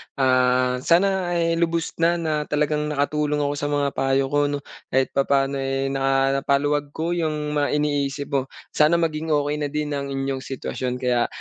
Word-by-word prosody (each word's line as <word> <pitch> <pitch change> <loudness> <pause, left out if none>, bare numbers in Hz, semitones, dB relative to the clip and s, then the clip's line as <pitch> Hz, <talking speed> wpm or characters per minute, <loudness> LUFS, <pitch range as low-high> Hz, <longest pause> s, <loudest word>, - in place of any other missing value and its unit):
ah, 125 -1 +2
sana 180 +3 +2
ay 165 0 +1
lubos 170 -1 0
na 170 +1 +3
na 160 -2 -1
talagang 150 0 0
naka-tulong 150 0 0
ako 145 - 0
sa 145 - -1
mga 145 -1 0
payo 135 0 0
ko 145 - +2
'no 145 0 -2 0.3
kahit 130 0 +1
papaano 140 0 +1
eh 135 0 -1
na 135 0 +1
paluwag 145 +1 +1
ko 165 +2 -2
yung 155 -3 -1
mga 145 -1 0
iniisip 145 -1 -1
mo. 135 -1 0 0.2
Sana 155 +3 +4
maging 160 -1 -1
okey 145 +1 0
na 145 - -1
din 150 0 -3
ang 140 -1 -2
inyong 135 0 -2
sitwasyon. 130 -1 -4
Kaya, 125 -2 +1
145 Hz, 175 wpm, -23 LUFS, 135-150 Hz, 0.3 s, Sana